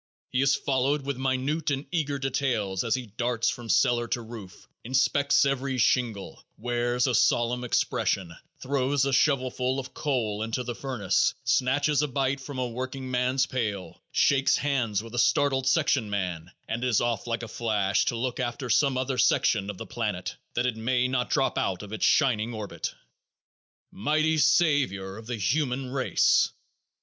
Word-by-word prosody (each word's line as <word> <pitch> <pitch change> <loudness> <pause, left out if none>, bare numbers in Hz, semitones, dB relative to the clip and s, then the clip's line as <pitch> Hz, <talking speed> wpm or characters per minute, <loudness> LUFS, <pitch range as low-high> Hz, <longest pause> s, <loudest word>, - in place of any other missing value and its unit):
He 125 - +1
is 135 0 +4
followed 140 +1 0
with 140 -2 -2
minute 135 +4 -1
and 140 0 -2
eager 150 -5 -1
details 125 -8 -1
as 115 0 +1
he 130 -1 -4
darts 115 +2 -1
from 120 -2 -8
cellar 120 -1 +3
to 120 +1 -2
roof, 110 -5 -11 0.2
inspects 140 +3 +2
every 135 -1 -1
shingle, 115 -4 0
wears 120 0 0
a 130 - +1
solemn 120 +1 +2
expression, 95 -6 0 0.3
throws 135 0 0
a 140 - 0
shovelful 130 -2 +1
of 135 0 -8
coal 115 -8 -1
into 115 +3 -2
the 120 0 -4
furnace, 120 -7 0
snatches 145 +3 +2
a 150 - 0
bite 135 0 -1
from 135 0 -8
a 130 -1 -1
workingman's 130 +1 -1
pail, 105 -7 -4
shakes 135 -1 +3
hands 120 -8 0
with 115 0 -11
a 120 - -1
startled 135 0 +2
section 140 -6 +2
man 90 -4 -3 0.2
and 115 +2 -3
is 125 -4 +2
off 120 0 -1
like 115 0 -2
a - - -5
flash 105 -4 0
to - - 0
look 125 +2 -3
after 120 0 -3
some 135 -3 +3
other 130 0 -1
section 100 -1 +2
of 100 - -6
the - - -7
planet 105 -6 -3 0.2
that 120 - +1
it 125 -3 0
may 125 +2 +1
not 130 -1 -1
drop 135 -2 +1
out 95 0 -2
of 105 +1 -9
its 110 - 0
shining 120 -5 +2
orbit. 100 -6 -5 1.0
Mighty 155 +7 +1
savior 145 - +2
of 110 0 -11
the 120 -1 -3
human 125 - -1
race! 135 -1 +3
125 Hz, 165 wpm, -27 LUFS, 115-135 Hz, 1.0 s, is